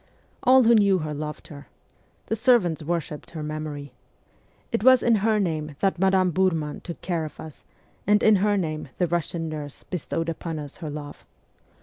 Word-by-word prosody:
All 260 0 +6
who 235 +1 +6
knew 200 -4 +5
her 155 -3 -4
loved 150 +1 -6
her. 145 -1 -11 0.6
The 225 - -1
servants 220 - +3
worshipped 155 -1 -4
her 155 -2 -6
memory. 150 -2 -5 0.8
It - - -1
was 255 0 +6
in 230 -2 +4
her 215 +1 +2
name 155 -6 -2
that 195 -3 +1
Madame 190 -1 +3
Biirman 165 -4 0
took 170 - -8
care 170 -3 -1
of 155 - -8
us, 155 -2 -10 0.4
and 210 0 +4
in 215 -2 +6
her 205 +1 +2
name 155 -5 -3
the 180 - +2
Russian 170 0 -2
nurse 150 -2 -6
bestowed 165 -1 -3
upon 165 0 -4
us 145 -2 -8
her 160 -4 -6
love. 145 0 -8
170 Hz, 180 wpm, -25 LUFS, 155-195 Hz, 0.8 s, All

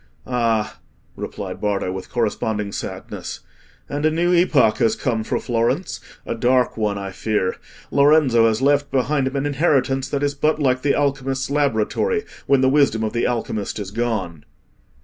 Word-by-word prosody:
"Ah!" 115 -3 0 0.4
replied - - -6
Bardo, 100 -3 -1
with 95 0 -6
corresponding 105 -3 -1
sadness, - - -6 0.5
"and 145 +1 -3
a 155 - +4
new 170 +3 +1
epoch 155 -10 +4
has 115 -3 +2
come 115 -4 -1
for - - -1
Florence—a 120 +9 -2
dark 125 +2 +2
one, 105 -2 -1
I 100 -1 -5
fear. 100 -1 -1 0.3
Lorenzo 140 -5 +5
has 110 +3 0
left 145 0 +3
behind 135 +1 +1
him 130 - -4
an 140 +1 -1
inheritance 135 -3 +1
that 140 0 -2
is 145 0 +1
but 150 +2 +1
like 130 -4 +1
the 140 0 +2
alchemist's 135 -1 -1
laboratory 145 - +1 0.2
when 140 -1 +4
the 130 - +4
wisdom 135 -6 +3
of 110 - -2
the 120 - +1
alchemist 115 -4 -3
is 100 -2 -5
gone." 100 -9 -2
130 Hz, 160 wpm, -21 LUFS, 110-145 Hz, 0.5 s, Lorenzo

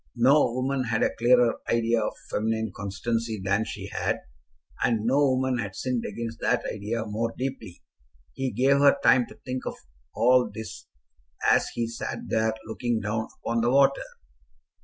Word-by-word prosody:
No 130 +2 +4
woman 130 +1 -1
had 115 -1 0
a - - +1
clearer 120 0 +4
idea 115 0 +2
of 105 - -2 0.2
feminine 110 0 -1
constancy 110 +2 -3
than 100 +3 0
she - - -6
had, - - -1 0.7
and 110 -3 +1
no 130 +4 +3
woman 130 -1 +1
had 100 -4 -4
sinned 125 -2 -2
against 115 +2 -6
that - - +1
idea 110 +2 -3
more 115 +2 -2
deeply. 130 -9 -5 0.5
He 135 +7 -2
gave 135 +5 +3
her 140 0 +6
time 125 -3 +5
to - - -13
think 130 0 -3
of - - -3 0.4
all 125 +1 +4
this 110 -1 -8 0.6
as - - +3
he 115 -1 -1
sat 115 - -5
there 110 0 +1
looking 115 +1 -2
down 110 +2 -2 0.2
upon 115 0 0
the 120 - +2
water. 140 +1 +4
115 Hz, 160 wpm, -26 LUFS, 110-125 Hz, 0.7 s, her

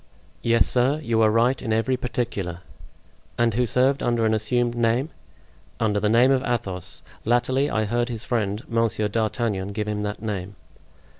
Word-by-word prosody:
"Yes, 115 0 +3
sir, 130 +4 +2
you 115 -3 +1
are 110 - +5
right 120 +4 +2
in 115 - -3
every 115 +4 +1
particular!" 115 -8 -3 0.8
"And 120 -1 +2
who 125 +2 +1
served 130 +4 +2
under 120 -2 +1
an 110 - +2
assumed 120 +3 +1
name?" 120 +5 0 0.7
"Under 105 -2 +1
the 105 - +1
name 120 +4 +5
of 130 -1 +3
Athos. 95 -9 -2 0.2
Latterly 125 +4 +1
I 110 -4 0
heard 120 +3 -1
his 115 -2 -4
friend, 110 -2 -1
Monsieur 115 -2 0
d'Artagnan, 105 -2 -1
give 105 0 -3
him 105 -1 -2
that 105 0 -4
name." 100 -3 -4
115 Hz, 165 wpm, -24 LUFS, 105-120 Hz, 0.8 s, are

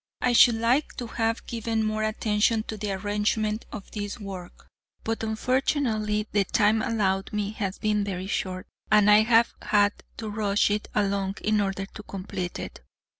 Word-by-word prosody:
I 245 - +2
should 235 0 +7
like 235 +6 +1
to 245 - -4
have 225 0 -1
given 225 -1 -2
more 215 0 -1
attention 215 0 +1
to 220 - -6
the 210 -1 -3
arrangement 210 +2 -1
of 205 - -8
this 205 +1 -5
work, 190 -4 -9 0.4
but 225 0 -2
unfortunately 220 -2 0
the 205 -1 +3
time 215 +3 +2
allowed 195 -4 0
me 210 -1 -2
has 200 -3 -3
been 210 -1 +1
very 190 -2 -4
short, 185 -2 -3 0.3
and 210 -1 +6
I 210 - +8
have 230 +1 +4
had 205 -1 +3 0.2
to 225 - -5
rush 205 -1 +1
it 210 +1 -1
along 200 -1 0
in 215 0 +2
order 195 -1 -2
to 215 - -11
complete 185 -3 -5
it. - - -7
210 Hz, 170 wpm, -26 LUFS, 200-220 Hz, 0.4 s, I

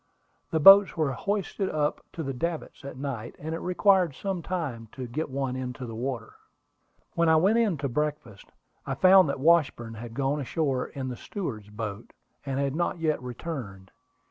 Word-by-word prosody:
The 160 - 0
boats 195 +3 +8
were 155 -4 +1
hoisted 195 +5 -2
up 150 -1 -1
to 165 - -4
the 135 -1 -3
davits 165 +2 -4
at 140 -2 -8
night, 130 -4 -5
and 160 +2 -5
it 165 - -3
required 180 -4 +3
some 195 -3 -3
time 145 -12 -4
to 130 - -6
get 145 +7 -4
one 135 -1 -2
into 125 0 -5
the 115 - -7
water. 120 -1 -4 0.8
When 170 -1 +2
I 160 - +6
went 195 +8 +4
in 210 -8 +1
to 140 0 -2
breakfast, 145 -6 -3 0.4
I - - -3
found 185 -3 +6
that 140 - -2
Washburn 140 -7 +2
had 115 +1 -9
gone 140 +2 0
ashore 135 -1 -1
in 130 -2 -5
the 125 - -4
steward's 115 - -6
boat, 105 0 -6 0.3
and 135 0 -1
had 140 0 -1
not 175 +2 -1
yet 155 -4 0
returned. 120 - -7
140 Hz, 180 wpm, -27 LUFS, 125-170 Hz, 0.8 s, boats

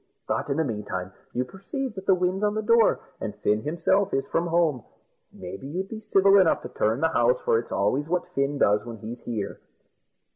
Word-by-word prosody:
But, - - -1
in 140 - 0
the 160 - +2
meantime, 100 -7 -4 0.2
you 125 +1 -1
perceive 220 - -5
that 190 -2 -9
the 190 - +6
wind's 180 +2 0
on 210 0 +1
the 215 - -1
door, 230 0 +4 0.2
and - - -4
as - - -30
Fin 105 +1 +2
himself 180 - +1
is 135 - 0
from 170 +1 -1
home, 165 -8 +1 0.5
maybe 95 +8 -8
you'd 185 +6 -4
be 220 - -6
civil 200 -2 +5
enough 180 -4 +3
to - - -6
turn 110 +4 0
the 160 - +3
house, 125 -4 +2
for 115 - +2
it's 120 - -8
always 130 +10 0
what 180 +1 -1
Fin 140 +1 0
does 105 -5 +3
when 115 -1 -8
he's 115 +3 -8
here." 110 -4 -4
155 Hz, 215 wpm, -26 LUFS, 115-190 Hz, 0.5 s, the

